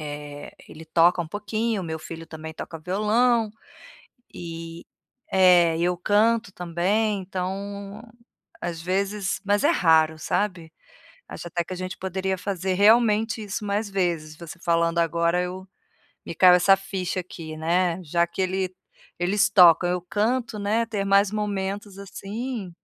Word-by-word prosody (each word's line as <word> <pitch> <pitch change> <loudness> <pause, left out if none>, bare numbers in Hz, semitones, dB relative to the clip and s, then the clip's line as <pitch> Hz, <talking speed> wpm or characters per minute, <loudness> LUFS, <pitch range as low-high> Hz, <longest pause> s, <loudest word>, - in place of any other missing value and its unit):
eh, 145 -1 -8 0.2
ele 160 +1 -11
toca 170 +2 +3
um 160 - -10
pouquinho, 215 +1 -2
meu 160 -1 -4
filho 165 +1 -9
também 160 0 -9
toca 165 - -7
violão, 215 +6 +1 0.9
eh 165 0 -8 0.5
é, 175 -3 +5
e 170 - -1
eu 180 0 +1
canto 215 +2 +2
também 195 +5 0
então, 200 +3 -5 0.6
às 170 -1 -4
vezes 195 +3 -2
mas 205 +5 +2
é 295 - +4
raro, 160 - +3
sabe. 180 -5 -2 0.6
Acho 175 - -8
até 170 +1 -2
que 185 - -9
a - - -8
gente 185 +1 -5
poderia 190 0 -2
fazer, 190 -1 -2
realmente, 220 +2 +3
isso 205 +1 -5
mais 205 +1 -1
vezes, 170 -5 -2
você 170 0 -10
falando 170 0 +1
agora 170 +1 +1
eu 185 +1 -6 0.6
me - - -5
caiu 180 +1 +7
essa 195 +2 +5
ficha 190 -1 -4
aqui, 160 -3 -9
né, 170 +2 +1
já 170 +2 +1
que 170 +2 -4
ele 185 0 -1 0.5
eles 200 +4 +2
tocam, 175 -3 +6
eu 180 -1 -1
canto, 220 +4 -1
né, 215 +3 0
ter 205 -3 -3
mais 200 0 +4
momentos 205 -1 -3
assim 205 +1 -6
185 Hz, 145 wpm, -24 LUFS, 170-205 Hz, 0.9 s, caiu